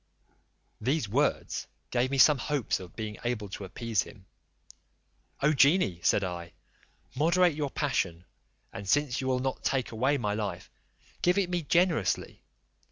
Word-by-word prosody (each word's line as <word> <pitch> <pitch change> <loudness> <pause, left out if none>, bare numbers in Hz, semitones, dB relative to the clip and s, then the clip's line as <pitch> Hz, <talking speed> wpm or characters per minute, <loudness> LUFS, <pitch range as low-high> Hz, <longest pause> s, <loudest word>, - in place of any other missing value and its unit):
These 130 +2 0
words 140 +8 0 0.2
gave 125 +1 +1
me 140 - -1
some 140 +1 +6
hopes 145 -2 -1
of 90 -2 -11
being 110 -1 -5
able 115 -4 -2
to 100 +1 -6
appease 110 +2 -1
him: 95 -3 -11 1.2
"O 150 +2 +4
genie," 140 - +4
said 100 - +3
I, 85 -2 -5 0.6
"moderate 170 +4 +3
your 145 -1 -2
passion, 90 - -1 0.5
and 100 -1 -7
since 145 -1 +2
you 130 - -3
will 130 -1 +2
not 130 +1 -3
take 130 -3 0
away 130 +6 +1
my 105 -5 -1
life, 100 -4 -4 0.5
give 180 +2 +3
it 185 -3 +1
me 175 -1 0
generously. 165 - +1
125 Hz, 150 wpm, -29 LUFS, 105-145 Hz, 1.2 s, some